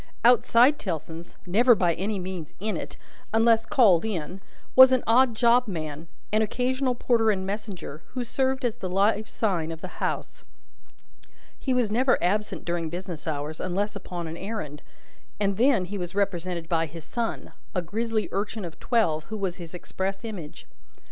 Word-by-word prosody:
Outside 245 +3 +5
Tellson's 165 -2 -5
never 230 +7 +5
by 175 -4 +2
any 200 +5 -2
means 180 -4 -6
in 215 +2 -2
it, - - -6 0.3
unless 225 0 +4
called 200 -10 +5
in 190 -3 -4 0.3
was 260 0 +10
an 255 -1 +3
odd 240 +1 +4
job 240 +1 +4
man, 155 -4 -5 0.3
an 215 - +4
occasional 250 +4 0
porter 230 -2 +2
and 190 -3 0
messenger, 195 -7 -5
who 250 - -1
served 265 +2 0
as 235 -1 -1
the 190 -6 -4
live 205 +3 +2
sign 175 -7 -1
of 165 0 -8
the 185 - -9
house. - - -3 1.2
He 265 - -2
was 245 -4 +2
never 255 +4 +3
absent 210 +4 -1
during 170 -2 -2
business 175 -2 -6
hours, 150 0 -3
unless 200 +3 -2
upon 180 -3 -5
an 160 +1 -6
errand, 190 -9 -5 0.6
and 200 -2 0
then 235 -5 +4
he 200 +2 -5
was 180 +1 -5
represented 180 -4 -1
by 165 -1 +1
his 165 +1 -10
son: 235 +6 -3 0.2
a 180 - 0
grisly 220 +5 -1
urchin 205 +1 -3
of 165 - -9
twelve, 165 -11 +1
who 220 - -5
was 190 -3 -2
his 170 0 -9
express 195 +3 -4
image. 185 -9 -7
200 Hz, 170 wpm, -26 LUFS, 175-230 Hz, 1.2 s, was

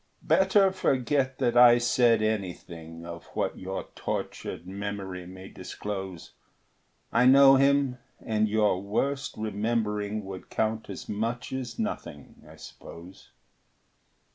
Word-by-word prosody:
Better 190 0 +4
forget 135 -5 0
that 120 -3 0
I 120 0 +8
said 120 -2 +3
anything 85 -6 -4
Of 85 0 -8
what - - -2
your 95 +1 -4
tortured - - -5
memory 95 -2 -5
may 95 +1 -10
disclose; 95 -5 -7 0.8
I 125 +2 +5
know 135 +1 +8
him, 140 -2 +2 0.2
and 110 -1 0
your 105 -3 +2
worst 135 +8 -2
remembering 105 -1 -2
Would 95 -1 -8
count 110 0 -2
as - - -7
much 115 +5 -3
as 130 -3 -5
nothing, 145 - -6
I - - -13
suppose. 90 +3 -12
110 Hz, 115 wpm, -27 LUFS, 95-125 Hz, 0.8 s, I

